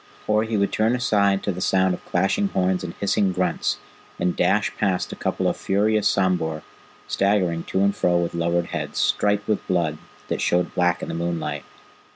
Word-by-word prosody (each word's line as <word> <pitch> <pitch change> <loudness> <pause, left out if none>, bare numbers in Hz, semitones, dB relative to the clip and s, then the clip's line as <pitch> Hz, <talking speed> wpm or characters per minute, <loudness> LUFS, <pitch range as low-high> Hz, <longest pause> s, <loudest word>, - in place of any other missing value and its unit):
Or 105 0 +2
he 110 -1 -1
would 100 0 +1
turn 110 +3 +2
aside 100 -5 +2
to 100 - 0
the 90 0 -6
sound 95 0 +2
of - - -7
clashing 95 - +1
horns 95 - 0
and 85 -2 -6
hissing 100 -1 +1
grunts, 90 -2 0 0.4
and 90 - 0
dash 100 +4 +1
past 95 -3 0
a - - -5
couple - - -1
of - - +1
furious 105 +1 +1
sambhur, 90 -5 0 0.4
staggering 95 -4 +1
to 95 - -1
and 100 0 +2
fro 90 0 +2
with 85 -1 -1
lowered 85 0 0
heads, - - -4
striped 105 0 +1
with 110 - -1
blood 85 -5 0 0.3
that - - -2
showed 90 +1 +1
black 90 -1 +1
in - - -4
the - - -4
moonlight. 85 0 -3
95 Hz, 190 wpm, -23 LUFS, 90-100 Hz, 0.4 s, Or